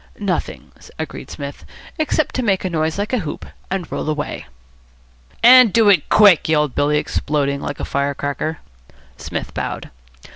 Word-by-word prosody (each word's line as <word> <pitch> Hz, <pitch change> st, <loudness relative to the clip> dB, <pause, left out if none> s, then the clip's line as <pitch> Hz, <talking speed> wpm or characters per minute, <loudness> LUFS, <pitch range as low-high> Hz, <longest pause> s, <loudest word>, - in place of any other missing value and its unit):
"Nothing," -, -, -3 dB, 0.3 s
agreed -, -, -6 dB
Psmith, 140 Hz, 0 st, -8 dB, 0.4 s
"except 310 Hz, -1 st, 0 dB
to 255 Hz, -, -1 dB
make 195 Hz, -5 st, 0 dB
a 185 Hz, -, -2 dB
noise 160 Hz, 0 st, -1 dB
like 205 Hz, +4 st, -3 dB
a 250 Hz, -, +2 dB
hoop 155 Hz, -7 st, -6 dB, 0.2 s
and 190 Hz, -3 st, -4 dB
roll -, -, -3 dB
away." 150 Hz, -1 st, -4 dB, 1.0 s
"And 250 Hz, -2 st, +8 dB
do 225 Hz, -1 st, +4 dB
it 185 Hz, -7 st, +3 dB
quick," 200 Hz, -7 st, +5 dB
yelled 150 Hz, -4 st, +2 dB
Billy, 145 Hz, +1 st, +1 dB
exploding 140 Hz, -2 st, -1 dB
like 145 Hz, -, -5 dB
a -, -, -3 dB
fire 140 Hz, 0 st, -1 dB
cracker. 145 Hz, +3 st, -3 dB, 0.6 s
Psmith -, -, -6 dB
bowed. -, -, -5 dB
160 Hz, 155 wpm, -19 LUFS, 145-205 Hz, 1.0 s, And